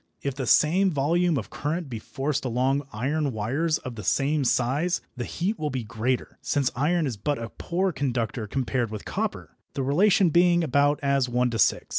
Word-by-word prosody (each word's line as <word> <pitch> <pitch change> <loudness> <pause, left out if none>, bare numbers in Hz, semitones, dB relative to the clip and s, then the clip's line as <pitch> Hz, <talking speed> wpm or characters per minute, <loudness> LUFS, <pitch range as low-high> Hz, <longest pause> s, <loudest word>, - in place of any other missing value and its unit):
If 140 - -1
the 130 -2 -4
same 185 +10 +4
volume 165 +2 +1
of 110 - -5
current 160 +3 -3
be 115 -4 -5
forced 140 +6 -3
along 130 +3 0
iron 140 +5 -1
wires 140 +10 0
of 125 - -7
the 110 -2 -8
same 140 +8 +1
size, 135 +8 +1 0.2
the 120 -1 -4
heat 200 +6 -2
will 150 - -1
be 130 -3 -3
greater, 115 +3 -2
since 140 -4 0
iron 155 +5 +1
is 125 -6 -3
but 145 +8 -1
a 115 0 -5
poor 185 +2 -1
conductor 120 -6 -2
compared 125 0 -1
with 105 -1 -7
copper, - - -3 0.2
the 135 - -1
relation 180 +6 +4
being 175 +1 +4
about 145 0 +2
as 140 -2 +2
one 125 0 +1
to 115 - -3
six. - - +3
140 Hz, 190 wpm, -26 LUFS, 125-155 Hz, 0.2 s, same